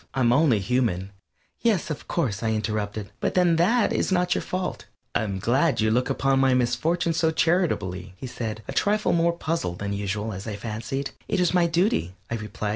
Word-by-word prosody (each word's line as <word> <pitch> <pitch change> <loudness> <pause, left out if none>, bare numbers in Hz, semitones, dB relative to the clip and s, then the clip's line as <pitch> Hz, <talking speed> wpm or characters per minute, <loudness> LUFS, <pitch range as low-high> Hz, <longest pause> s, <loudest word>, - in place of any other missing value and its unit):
I'm 120 -3 +3
only 140 -4 +4
human 100 -3 0 0.2
" - - -41
"Yes, 215 -8 +1
of 150 - -6
course," 120 - -1
I 110 -1 0
interrupted, 105 -1 -3
"but - - -1
then 175 -3 +4
that 210 +7 +3
is - - 0
not 180 -1 +2
your - - -1
fault 185 0 -4
" - - -49
"I'm 105 -2 -1
glad 135 - +2
you 110 0 +2
look 125 +3 +1
upon 135 -1 +2
my 135 -1 +4
misfortune 155 +8 +1
so 160 0 +2
charitably," 100 - 0
he - - -7
said, 110 -3 -5
a - - -4
trifle 210 +1 +2
more 170 0 +3
puzzled 160 - -2
than 100 +1 -3
usual, 105 +2 -2
as 95 +3 -7
I 105 - -3
fancied. 115 +6 -4 0.2
"It - - 0
is 180 -1 +2
my 175 -2 +4
duty," 165 - +1 0.2
I - - 0
replied. 105 -1 -4
125 Hz, 200 wpm, -25 LUFS, 105-170 Hz, 0.2 s, only